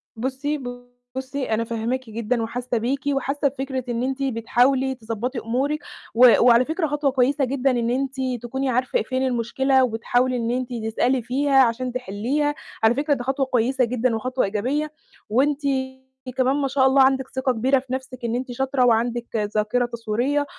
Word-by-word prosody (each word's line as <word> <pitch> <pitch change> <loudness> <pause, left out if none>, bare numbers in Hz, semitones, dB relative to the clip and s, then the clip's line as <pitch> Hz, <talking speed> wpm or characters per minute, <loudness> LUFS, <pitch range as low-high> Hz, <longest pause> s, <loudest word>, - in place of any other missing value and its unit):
بُصّي، 265 +5 -2 0.6
بُصّي 265 +1 -4
أنا 220 +1 +1
فاهماكِ 230 +2 -3
جدًا 230 +2 -1
وحاسّة 245 +2 -2
بيكِ 250 +5 -1
وحاسّة 275 +1 0
بفكرة 265 -1 -3
إن 240 0 -1
أنتِ 270 +1 -2
بتحاولي 260 +2 +1
تضبّطي 235 +2 -4
أمورِك، 265 +7 -1 0.4
و 245 +2 +7
وعلى 240 +1 +6
فكرة 320 +2 -1
خطوة 290 -1 0
كويسة 265 +2 +2
جدًا 270 +1 +1
إن 235 -2 0
أنتِ 265 +2 -1 0.3
تكوني 265 +3 -2
عارفة 255 +1 +1
فين 260 +3 -1
المشكلة 260 +2 +2
وبتحاولي 245 +2 +1
إن 230 0 -1
أنتِ 250 0 -2
تسألي 245 +3 +1
فيها 270 +3 +3
عشان 250 +1 -1
تحلِّيها. 255 +6 -1 0.3
على 225 +2 +5
فكرة 290 +2 +1
ده 245 - -3
خطوة 270 +1 0
كويسة 255 +1 +1
جدًا 245 0 0
وخطوة 255 +3 -1
إيجابية 255 +10 -1 0.4
وأنتِ 275 +6 +2 0.8
كمان 260 +1 +2
ما 285 -1 0
شاء 265 0 +3
الله 265 +1 +5
عندِك 265 0 +2
ثِقة 260 0 +1
كبيرة 255 +3 +2
في 255 0 -8
نَفْسِك 260 -1 -5
إن 230 0 -1
أنتِ 255 +1 -3
شاطرة 265 +1 +1
وعندِك 235 0 +1 0.3
ذاكرة 215 +4 +1
تصويرية 240 +5 -1
255 Hz, 165 wpm, -23 LUFS, 235-270 Hz, 0.8 s, و